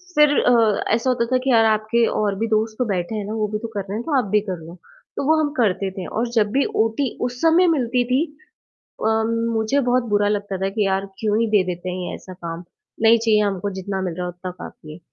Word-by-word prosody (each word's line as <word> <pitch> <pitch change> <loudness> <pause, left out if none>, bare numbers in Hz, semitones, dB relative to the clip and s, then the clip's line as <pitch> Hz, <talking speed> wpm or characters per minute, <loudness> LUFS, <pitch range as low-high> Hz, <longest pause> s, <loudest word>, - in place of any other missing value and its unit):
फिर 300 0 +6
अ, 230 -4 +3
ऐसा 230 +3 +1
होता 240 -2 +1
था 255 +2 +1
कि 270 - +1
यार 225 -1 +5
आपके 220 +2 +2 0.2
और 200 -2 0
भी 225 - 0
दोस्त 220 0 0
तो 250 - +2
बैठे 190 0 -2
हैं 210 -2 -3
ना, 210 - -5
वो 215 -1 -1
भी 210 +1 -3
तो 230 - -5
कर 210 -3 -4
रहे 195 +2 -6
हैं 235 - -4
तो 295 -4 +1
आप 250 - +1
भी 210 - +4
कर 185 - -2
लो। 170 +2 -10 0.4
तो - - -1
वो 315 - +5
हम 295 - 0
करते 195 -4 +1
थे 190 -1 -6
और 235 +2 -2
जब 210 -3 +2
भी 275 +4 +2 0.2
ओटी 225 +3 -2
उस 245 0 -8
समय 330 +2 +5
मिलती 250 -6 +1
थी, 255 +5 +2 0.8
अम, 220 0 +1 0.2
मुझे 225 +5 +1
बहुत 250 0 +3
बुरा 205 0 +3
लगता 205 -2 -2
था 190 +1 -1
कि 210 0 0
यार 195 0 0
क्यों 215 -1 +1
ही 230 - +2
दे 210 -3 +4
देते 180 0 -4
हैं 180 -1 -4
ऐसा 185 - -10
काम, 170 -1 -7 0.4
नहीं 225 +1 +6
चाहिए 220 -2 +3
हमको 200 0 -1
जितना 190 +1 -3
मिल 180 -3 -3
रहा 180 +1 -4
है - - -3
उतना 180 +1 -7
काफ़ी 155 -3 -11
है। 155 - -10
215 Hz, 255 wpm, -21 LUFS, 195-235 Hz, 0.8 s, फिर